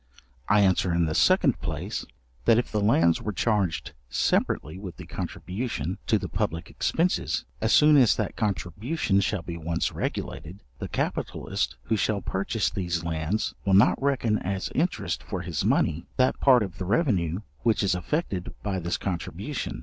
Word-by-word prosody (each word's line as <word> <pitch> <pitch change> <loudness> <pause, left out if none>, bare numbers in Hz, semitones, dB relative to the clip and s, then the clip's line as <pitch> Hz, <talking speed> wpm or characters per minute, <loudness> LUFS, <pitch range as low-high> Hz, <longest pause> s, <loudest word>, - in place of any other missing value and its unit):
I 105 0 +5
answer 95 -2 +3
in 85 0 +2
the 75 - -1
second - - +3
place, - - -4 0.4
that 115 -1 +6
if 120 - 0
the 105 - 0
lands 85 -6 +3
were 105 - -2
charged 100 -8 0 0.2
separately 75 +6 0
with 95 -4 -8
the - - -9
contribution 90 - -4
to - - +4
the - - -4
public 80 +1 -3
expences, 175 +3 0 0.2
as 110 - +1
soon 150 0 +7
as 125 -5 +6
that - - -2
contribution 105 - 0
shall 100 -2 -1
be 85 +1 -6
once 85 +1 -1
regulated, 90 +6 -5 0.2
the - - -4
capitalist - - -2
who 110 - 0
shall 105 0 +1
purchase 100 +4 -1
these 85 -3 -2
lands 85 +5 -1
will 95 -1 +3
not 105 +7 +5
reckon 125 -6 +1
as 95 +1 -3
interest 170 +6 -1
for 95 -3 -5
his 85 -5 -3
money, 80 +2 +1
that 130 0 +2
part 125 -4 +6
of 90 -3 -7
the 95 - -3
revenue 95 - +1 0.2
which 115 -2 +2
is 95 - +2
affected 95 - -2
by 100 -3 -1
this 85 0 -2
contribution. 90 -5 -4
95 Hz, 165 wpm, -26 LUFS, 85-110 Hz, 0.4 s, soon